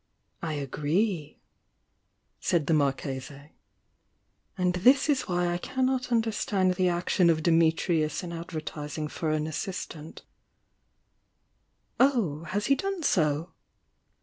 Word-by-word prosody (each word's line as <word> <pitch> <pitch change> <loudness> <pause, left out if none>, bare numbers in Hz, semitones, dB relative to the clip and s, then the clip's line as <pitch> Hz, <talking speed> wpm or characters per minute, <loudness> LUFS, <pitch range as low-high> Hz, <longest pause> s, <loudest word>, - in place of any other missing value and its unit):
"I 160 -2 -3
agree!" 150 - -1 1.0
said 165 -4 +1
the 165 - +1
Marchese. 140 0 -2 1.1
"And 180 -1 +1
this 260 - +5
is 285 -4 +1
why 175 -1 0
I 175 - -2
cannot 255 +2 -1
understand 210 -5 +1
the 180 0 +2
action 175 0 +2
of 160 -1 +2
Dimitrius 165 -1 +2
in 170 -1 -6
ad 170 0 -6
vertising 155 -2 -5
for 160 - -2
an 155 0 0
assistant 160 -1 -6 0.9
" - - -46
"Oh, 205 - +2
has 205 +6 -2
he 275 - +4
done 385 +4 -2
so?" 155 - +1
170 Hz, 120 wpm, -28 LUFS, 155-205 Hz, 1.1 s, this